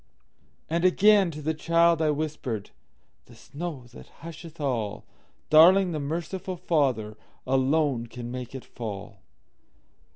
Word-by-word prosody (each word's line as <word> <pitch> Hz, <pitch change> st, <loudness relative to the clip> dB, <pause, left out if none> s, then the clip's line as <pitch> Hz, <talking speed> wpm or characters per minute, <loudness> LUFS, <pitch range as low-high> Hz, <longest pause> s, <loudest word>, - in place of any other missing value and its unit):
And 170 Hz, +2 st, -1 dB
again 200 Hz, +1 st, +5 dB
to 155 Hz, -2 st, -8 dB
the 160 Hz, +2 st, 0 dB
child 170 Hz, +1 st, +3 dB
I 155 Hz, -, +2 dB
whispered,"The 145 Hz, -8 st, -6 dB
snow 145 Hz, -3 st, -7 dB
that -, -, -12 dB, 0.2 s
husheth 165 Hz, 0 st, -10 dB
all, 120 Hz, -8 st, -2 dB, 0.5 s
Darling, 180 Hz, +4 st, +7 dB
the 155 Hz, -, -3 dB
merciful 170 Hz, +5 st, -4 dB
FatherAlone 135 Hz, -2 st, 0 dB
can 120 Hz, 0 st, -7 dB
make 125 Hz, 0 st, -7 dB
it 130 Hz, -, -8 dB
fall!" 105 Hz, -5 st, -7 dB
155 Hz, 110 wpm, -26 LUFS, 125-170 Hz, 0.5 s, Darling